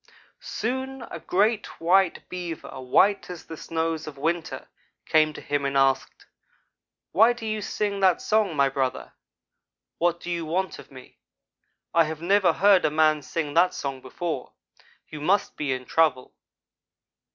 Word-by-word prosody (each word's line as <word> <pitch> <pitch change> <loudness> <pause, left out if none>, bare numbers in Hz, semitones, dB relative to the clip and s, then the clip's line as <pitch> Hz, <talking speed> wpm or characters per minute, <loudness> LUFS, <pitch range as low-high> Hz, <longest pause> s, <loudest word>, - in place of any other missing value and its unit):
"Soon 260 +3 -4
a - - -6
great 210 +3 0
white 180 +2 +2
Beaver 170 -7 -6
white 195 +12 +3
as 180 -2 -8
the 165 - -8
snows 160 0 -3
of 145 -2 -8
winter 165 +3 -2 0.4
came 155 -1 +3
to - - -9
him 145 -1 -1
and 140 0 0
asked: 135 -1 +1 0.9
'Why 225 +5 +5
do 240 -2 -9
you 215 -1 -2
sing 205 -1 -2
that 190 -2 +4
song, 210 -6 +1
my 140 -1 +4
brother? 135 -1 -2 0.9
What 170 0 +1
do 175 - -6
you 170 -1 -2
want 180 +4 -2
of - - -13
me? 130 -2 -15 0.7
I 165 -1 +5
have 155 0 -5
never 185 +1 +3
heard 195 +1 +5
a - - +3
man 155 0 +3
sing 150 0 -4
that 180 +3 +3
song 135 -2 -4
before. 135 +1 -5 0.5
You 155 -1 -9
must 195 +6 +1
be 145 -3 -2
in 130 -1 -3
trouble.' 150 -5 +1
165 Hz, 155 wpm, -25 LUFS, 150-195 Hz, 0.9 s, Why